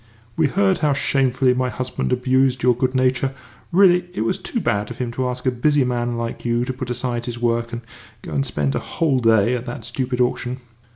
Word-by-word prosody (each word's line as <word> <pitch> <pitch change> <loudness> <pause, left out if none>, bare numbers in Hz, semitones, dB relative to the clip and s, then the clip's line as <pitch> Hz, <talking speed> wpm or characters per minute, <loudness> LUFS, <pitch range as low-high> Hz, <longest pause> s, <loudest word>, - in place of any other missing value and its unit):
"We 160 -2 +3
heard 195 +5 +2
how 150 -2 +2
shamefully 130 -2 +2
my 130 0 0
husband 125 +2 -3
abused 130 0 +2
your 125 -1 +4
good 130 +2 -1
nature. 130 +1 +1 0.4
Really, 180 -1 +4
it - - -1
was 185 +1 0
too 235 +5 -3
bad 105 - -1
of 120 - -8
him 125 -2 -3
to 125 +1 -1
ask 125 +1 -6
a 130 - +3
busy 145 +3 +2
man 120 -1 -1
like 115 0 -4
you 120 0 0
to 130 - -3
put 130 -1 -6
aside 125 -1 -2
his 120 -1 -4
work 115 0 0
and 115 - -5 0.4
go - - -7
and 140 - +1
spend 75 - -1
a 70 - 0
whole 150 -6 0
day 115 -1 +3
at 125 0 -3
that 120 -1 -6
stupid 125 +1 -2
auction!" 125 0 0
125 Hz, 220 wpm, -21 LUFS, 120-135 Hz, 0.4 s, your